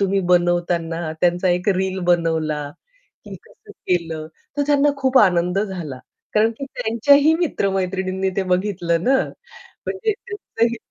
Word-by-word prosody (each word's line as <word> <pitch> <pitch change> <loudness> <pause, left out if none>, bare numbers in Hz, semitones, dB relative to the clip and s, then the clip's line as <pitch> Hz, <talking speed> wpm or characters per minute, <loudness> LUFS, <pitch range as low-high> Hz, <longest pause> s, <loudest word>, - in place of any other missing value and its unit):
तुम्ही 195 0 +1
बनवताना 175 -2 0
त्यांचा 175 +1 +2
एक 180 +3 0
रील 190 0 -1
बनवला, 160 -3 +1 0.6
की - - -9
कसं 435 -3 -19
केलं 165 - -2 0.3
तर 290 - +2
त्यांना 290 0 +3
खूप 265 -1 +3
आनंद 180 -1 +3
झाला. 175 -10 -5 0.4
कारण 215 +2 +4
की 275 - -4
त्यांच्याही 280 +7 +4
मित्र-मैत्रिणींनी 190 - -1
ते 195 - +1
बघितलं 180 -3 -1
ना 265 +1 +4 0.7
म्हणजे 430 +3 -1
त्याचंही 395 - -3
190 Hz, 125 wpm, -21 LUFS, 175-255 Hz, 0.7 s, कारण